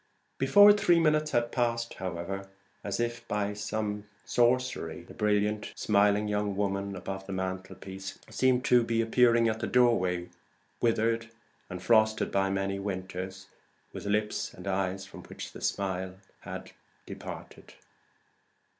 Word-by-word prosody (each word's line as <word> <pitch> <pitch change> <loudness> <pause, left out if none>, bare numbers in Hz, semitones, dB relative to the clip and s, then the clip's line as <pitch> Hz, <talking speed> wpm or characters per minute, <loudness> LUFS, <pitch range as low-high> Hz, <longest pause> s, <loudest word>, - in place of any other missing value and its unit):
Before 205 0 +8
three 175 -4 +4
minutes 155 -1 +3
had 120 -3 +1
passed, 115 -2 0
however, 95 +2 -5 0.3
as 100 0 -3
if 120 0 -2
by 105 0 -1
some 105 0 -3 0.2
sorcery, 125 +1 +1
the - - -13
brilliant 105 0 0
smiling 105 0 +3
young 105 -1 -1
woman 100 0 -1
above 95 +1 -6
the 100 - -4
mantelpiece 95 +1 -5
seemed 130 -1 +2
to 125 -1 +5
be 115 0 0
appearing 115 0 +4
at 110 0 -1
the - - -2
doorway 95 -8 +2 0.5
withered 115 0 +1 0.4
and 90 -1 -6
frosted 110 -1 +3
by 95 0 +2
many 95 0 -1
winters, 95 -1 -5
and - - -34
with 100 - -4
lips 105 0 0
and 90 - -11
eyes 95 0 -1
from 95 - -11
which - - -8
the - - -11
smile 95 -1 -2 0.2
had - - -8 0.3
departed. - - -9
105 Hz, 135 wpm, -29 LUFS, 95-115 Hz, 0.5 s, Before